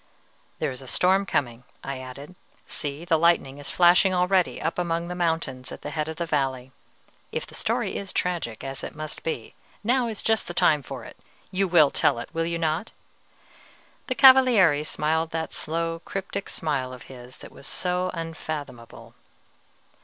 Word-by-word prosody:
"There - - -1
is 130 0 -8
a 130 - -11
storm 190 +7 +3
coming," 120 -7 -1 0.2
I 135 -1 -4
added. 135 +6 -9 0.3
"See, 145 +2 -4
the 165 -3 +3
lightning 160 -5 +2
is 145 - -6
flashing 180 +2 +5
already 180 0 +2
up 165 - -2
among 170 0 -1
the - - -3
mountains 160 -7 -2
at - - -9
the 145 - -5
head 150 +1 -2
of 160 - -4
the 170 - -2
valley; 135 -5 -1 0.6
if - - -3
the - - -16
story - - -1
is 195 -1 -5
tragic, 170 -11 -2
as 135 0 -5
it - - -6
must 155 0 -5
be, 125 -8 -4 0.3
now 245 +2 +2
is 220 -3 -4
just 220 -1 +1
the 175 - -6
time 150 -3 +4
for - - -8
it. - - -12 0.3
You 195 +1 +1
will 160 -5 +5
tell - - +2
it, 120 - -6
will 165 0 0
you 170 0 -1
not?" 165 +5 -1 1.2
The 255 - -1
Cavaliere 250 - +7
smiled 160 +1 0
that 160 0 -3
slow, 165 +1 -2
cryptic 195 0 -4
smile 135 -5 -2
of 125 - -10
his 125 -1 -12
that - - -12
was 140 - -11
so 180 0 0
unfathomable. 150 -7 -6
165 Hz, 175 wpm, -25 LUFS, 140-180 Hz, 1.2 s, Cavaliere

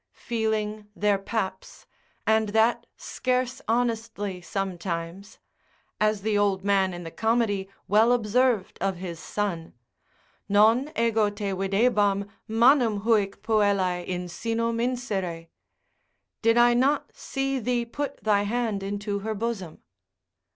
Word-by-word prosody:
feeling 215 -2 -2
their 205 -1 +2
paps, 195 -2 -4 0.4
and 220 -1 +2
that 220 +3 +2
scarce 255 0 -2
honestly 225 -5 -1
sometimes: 180 0 -4 0.6
as 215 -1 +1
the 215 -1 0
old 200 -2 +1
man 195 -2 +2
in 175 0 -7
the 165 - -7
Comedy 220 -3 0 0.2
well 220 +3 +4
observed 240 -2 +1
of 195 0 0
his 175 -2 -7
son, 170 - -3 0.7
Non 225 +8 +4
ego 225 -2 +2
te 205 -1 -4
videbam 200 +1 +1 0.2
manum 230 -1 +4
huic 210 -3 +1
puellae 200 -5 +1
in 180 -1 -3
sinum 230 +5 -2
insere? 195 -10 -3 0.9
Did 230 0 +4
not 240 +4 +4
I - - -33
see 270 0 -2
thee 240 0 0
put 280 +3 -5
thy 210 -2 +3
hand 220 -1 -1
into 200 +1 -3
her 220 +2 -3
bosom? 205 -6 -4
210 Hz, 120 wpm, -26 LUFS, 195-230 Hz, 0.9 s, well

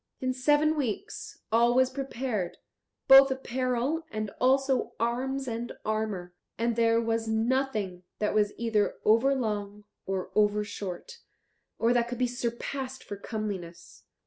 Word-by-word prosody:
In 255 0 -1
seven 295 +4 +3
weeks 295 - -4
all 235 +2 +4
was 260 0 +4
prepared, 255 -8 -3 0.5
both 270 0 +9
apparel 260 +3 -1
and 215 -2 -4
also 265 0 +2
arms 260 +4 -1
and 235 0 -3
armour; 215 -5 -2 0.2
and 235 0 0
there 230 0 +3
was 225 -1 -1
nothing 220 -5 0 0.2
that 210 - 0
was 210 -1 +2
either 225 -3 +1
over 235 +6 +4
long 210 -4 -3 0.2
or 190 -1 -3
over 210 0 +3
short, 205 - -7 0.6
or 230 +1 +3
that 240 -1 +2
could 245 0 -5
be 250 - +2
surpassed 250 +2 -4
for 205 - -6
comeliness. 195 -5 -6
235 Hz, 135 wpm, -28 LUFS, 215-260 Hz, 0.6 s, both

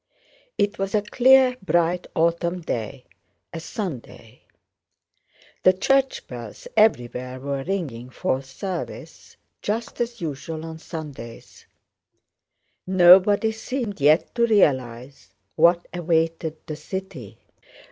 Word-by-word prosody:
It 205 0 0
was 195 +2 -1
a 210 - +2
clear 255 +3 +5
bright 175 -1 +1
autumn 170 +2 0
day, 125 -3 -5 0.5
a 165 - -4
Sunday. 140 - -7 1.2
The 185 - +6
church 270 +7 +1
bells 120 -4 -9
everywhere 125 - +1
were 140 0 -3
ringing 140 -10 -4
for 130 +1 -1
service, 170 +8 -7 0.2
just 225 +3 -3
as 235 0 -3
usual 160 0 -5
on 160 0 -8
Sundays. 145 -9 -9 1.2
Nobody 190 +4 +6
seemed 220 - -5
yet 150 +4 +4
to 235 -1 +2
realize 130 - 0 0.2
what 170 +2 +4
awaited 165 -2 0
the 155 - -5
city. 150 - -7
170 Hz, 105 wpm, -23 LUFS, 135-200 Hz, 1.2 s, The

